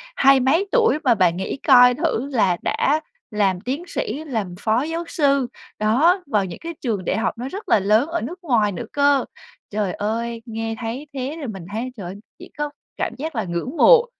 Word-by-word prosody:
Hai 275 - +6
mấy 320 +10 +2
tuổi 465 -9 +4
mà 245 -4 +4
bạn 180 -3 +2
nghĩ 190 - -3
coi 250 -2 +8
thử 280 -3 -1
là 190 -7 +3
đã 300 +3 +1 0.3
làm 195 -3 +1
tiến 275 +7 -3
sĩ, 285 -1 -3
làm 220 - -3
phó 225 +3 +1
giáo 330 +2 -3
sư. 280 -5 +2 0.3
Đó, 300 - +3
vào 205 -7 +1
những 175 - -8
cái 335 0 -5
trường 210 -8 -2
đại - - 0
học 225 - -1
nó 245 - -4
rất 400 +3 -7
là - - +5
lớn 215 +7 +3
ở 340 0 -2
nước 355 +2 -6
ngoài 220 -8 +2
nữa 175 - -5
cơ. 285 -1 +3 0.4
Trời 205 -3 -1
ơi, 230 +2 -3
nghe 225 0 -4
thấy 245 +5 -5
thế 275 +4 -4
thì 280 - -4
mình 195 -6 -7
thấy 235 +4 -3
trời 195 - -7
ơi, 185 +3 -6 0.2
chỉ 360 - -11
có 295 0 -1 0.3
cảm - - -2
giác 310 +1 -5
là 220 - 0
ngưỡng 180 - -4
mộ 485 -1 +7
245 Hz, 210 wpm, -22 LUFS, 210-295 Hz, 0.4 s, coi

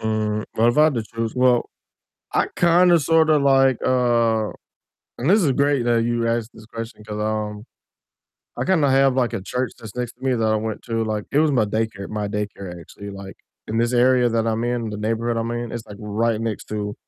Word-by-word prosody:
Mm, 110 -1 -1
well 115 +2 +4
if 120 - +1
I 155 - +7
had 155 -2 +3
to 115 - -1
choose, 115 -1 -2
well, 125 -1 +2 0.6
I - - +2
kinda 175 0 +5
sorta 160 +1 +3
like, 135 -2 +4
uh 115 -3 +2 0.7
and 135 +7 0
this 205 +1 +5
is 145 -5 +2
great 140 -1 +1
that 120 -1 +2
you 120 0 0
asked 115 -1 -1
this 110 - -14
question 115 -1 -8
'cause, 105 0 -6
um, 105 -1 -3 0.9
I - - -2
kinda 165 -6 +2
have, 135 0 +4
like, 125 -2 +1
a - - -3
church 125 +3 -3
that's 110 -2 -11
next 125 -1 -3
to 125 - -27
me 130 -1 +2
that 115 -2 0
I - - +2
went 110 0 -4
to, 115 -1 -2
like, 105 -1 -2
it 140 - +3
was 155 -1 +3
my 125 -6 +2
daycare 105 -2 -3
my 105 -1 -3
daycare 100 -3 -5
actually, 100 +5 -10
like, 100 0 -9 0.3
in 110 - -2
this 120 +1 +1
area 125 0 +4
that 115 -1 0
I'm 110 0 0
in, 120 -2 -2
the 105 - -5
neighborhood 115 +2 -1
I'm 115 0 -2
in, 120 0 -4
it's, 115 -2 -6
like, 105 - -10
right 110 +1 -1
next 115 -2 -4
to 105 -1 -4
115 Hz, 220 wpm, -22 LUFS, 110-125 Hz, 0.9 s, I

